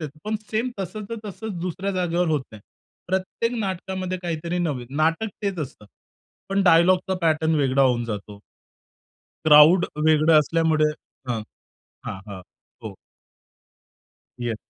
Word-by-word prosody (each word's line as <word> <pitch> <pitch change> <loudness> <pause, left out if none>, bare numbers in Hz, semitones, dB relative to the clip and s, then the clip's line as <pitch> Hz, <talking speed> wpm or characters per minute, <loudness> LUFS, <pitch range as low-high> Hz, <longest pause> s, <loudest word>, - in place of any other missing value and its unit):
देतो, 155 -1 -7
पण 215 +1 -1
सेम 230 +3 -1
तसंच-तसंच 215 +1 -6
दुसऱ्या 185 +2 -3
जागेवर 175 -1 0
होत 150 -4 +1
नाही. 105 - -11 0.5
प्रत्येक 190 +5 -1
नाटकामध्ये 185 -1 -3
काहीतरी 170 0 -3
नवीन, 145 -8 -2
नाटक 165 +8 +1
तेच 195 -3 -2
असतं. 130 -7 -6 0.6
पण 195 0 +1
डायलॉगचा 180 +2 +4
पॅटर्न 160 -1 +2
वेगळा 140 -2 +2
होऊन 125 -3 +2
जातो. 105 -2 -6 1.1
क्राउड 155 +4 +7 0.2
वेगळं 155 0 +5
असल्यामुळे 155 0 +2 0.4
हां, 115 -3 -1 0.6
हां, - - -5
हां. 100 -2 -7 0.4
हो. - - -7 1.4
येस. 120 -2 -2
165 Hz, 120 wpm, -23 LUFS, 150-190 Hz, 1.4 s, क्राउड